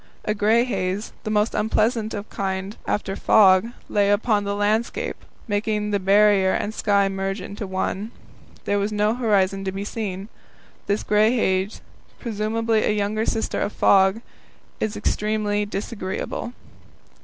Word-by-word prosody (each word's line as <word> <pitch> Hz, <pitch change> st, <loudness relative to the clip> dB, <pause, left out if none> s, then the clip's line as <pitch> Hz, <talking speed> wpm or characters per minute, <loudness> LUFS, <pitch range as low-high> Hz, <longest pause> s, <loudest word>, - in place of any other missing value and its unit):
A 210 Hz, -, +1 dB
grey 220 Hz, +3 st, +3 dB
haze, 195 Hz, -3 st, -2 dB
the -, -, -2 dB
most 210 Hz, +1 st, +1 dB
unpleasant 220 Hz, +1 st, 0 dB, 0.2 s
kind 190 Hz, 0 st, -3 dB
of -, -, -23 dB
light -, -, 0 dB
after 195 Hz, -2 st, -1 dB
fog, 195 Hz, -1 st, +5 dB, 0.2 s
lay 205 Hz, -1 st, +2 dB
upon 205 Hz, 0 st, +2 dB
the 200 Hz, 0 st, -1 dB
landscape, 220 Hz, -, 0 dB, 0.3 s
making 210 Hz, 0 st, -1 dB
the 200 Hz, -, +1 dB
Barrier 195 Hz, 0 st, +4 dB
and 210 Hz, -, -2 dB
the -, -, -14 dB
sky 200 Hz, -2 st, +3 dB
merge 195 Hz, +1 st, -3 dB
into 200 Hz, +2 st, -6 dB
one. 190 Hz, +2 st, -2 dB, 0.6 s
There 205 Hz, -, +1 dB
was 200 Hz, +2 st, -1 dB
no 210 Hz, +1 st, +1 dB
horizon 200 Hz, -5 st, +1 dB
to 190 Hz, -, -1 dB
be 195 Hz, +1 st, -5 dB
seen. 200 Hz, -3 st, -4 dB, 0.6 s
This 205 Hz, +1 st, 0 dB
grey 215 Hz, +3 st, +3 dB
haze, 190 Hz, -2 st, 0 dB, 0.4 s
presumably 225 Hz, 0 st, 0 dB
a 210 Hz, -, +1 dB
younger 210 Hz, +2 st, -1 dB
sister 225 Hz, -, -1 dB
of 205 Hz, -, -2 dB
fog, 195 Hz, +2 st, +4 dB, 0.6 s
is 215 Hz, -1 st, -2 dB
extremely 210 Hz, 0 st, 0 dB
disagreeable. 200 Hz, +2 st, -4 dB
205 Hz, 150 wpm, -23 LUFS, 195-215 Hz, 0.6 s, fog